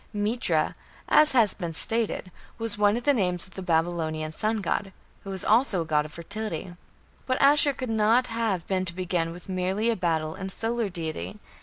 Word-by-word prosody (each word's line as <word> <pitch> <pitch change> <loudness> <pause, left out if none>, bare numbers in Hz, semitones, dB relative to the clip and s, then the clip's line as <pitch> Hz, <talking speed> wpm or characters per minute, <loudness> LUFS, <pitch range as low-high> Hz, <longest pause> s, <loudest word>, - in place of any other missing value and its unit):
Mitra, 205 -6 0 0.3
as 305 -1 +6
has 225 -6 +4
been 170 -4 -5
stated, 220 0 -1 0.3
was 225 -2 -2
one 205 +1 +3
of 240 - -4
the 290 - +4
names 180 -7 0
of 190 - -18
the 190 - -7
Babylonian 160 -2 0
sun 215 +7 -1
god, 195 0 -2 0.3
who 195 - -8
was 190 -1 -4
also 220 -4 +3
a - - -11
god 150 -1 +1
of 155 - -9
fertility. 185 -1 -5 0.5
But 255 -1 0
Ashur 285 0 +5
could 255 -1 -5
not 225 +3 +3
have 225 -7 -1
been 190 -1 0
to 170 -1 -2
begin 175 -2 -1
with 175 +1 -11
merely 190 +4 0
a - - 0
battle 160 -4 0
and 190 +2 -5
solar 230 +1 -1
deity. 160 - -5
195 Hz, 190 wpm, -26 LUFS, 170-225 Hz, 0.5 s, as